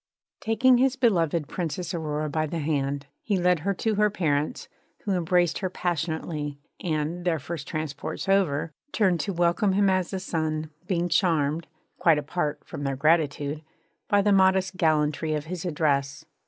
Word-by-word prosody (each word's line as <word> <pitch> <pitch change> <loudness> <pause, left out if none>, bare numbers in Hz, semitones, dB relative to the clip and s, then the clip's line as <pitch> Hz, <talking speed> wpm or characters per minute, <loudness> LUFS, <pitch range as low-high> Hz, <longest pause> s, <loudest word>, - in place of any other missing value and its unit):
Taking 240 +3 +4
his 265 0 +3
beloved 170 - +2
Princess 175 0 -3
Aurora 155 -2 -2
by 155 +1 -1
the 165 - -4
hand, 145 -2 -1 0.2
he 205 -3 0
led 180 -1 +3
her 200 +6 0
to 220 +4 0
her 210 - +5
parents, 155 - -1 0.4
who 205 - -2
embraced 175 -1 +2
her 185 - -2
passionately 160 -4 -3 0.3
and 160 +1 -2
their 170 -2 +1
first 155 +1 -6
transports 155 +3 -4
over 170 -6 +2 0.2
turned 185 -6 +2
to, 195 - -2
welcome 175 +3 +2
him 200 0 +3
as 185 -2 0
a 190 - -2
son, 155 -4 -2 0.2
being 175 -2 0
charmed 165 -3 +1 0.3
(quite 165 -3 +5
apart 150 +1 -2
from 145 - -7
their 135 -1 -1
gratitude) 150 0 +1 0.5
by 205 -1 +3
the 205 - +3
modest 190 0 +3
gallantry 155 -2 +1
of 150 0 -3
his 175 +1 -5
address. 145 -3 0
165 Hz, 160 wpm, -26 LUFS, 150-185 Hz, 0.5 s, her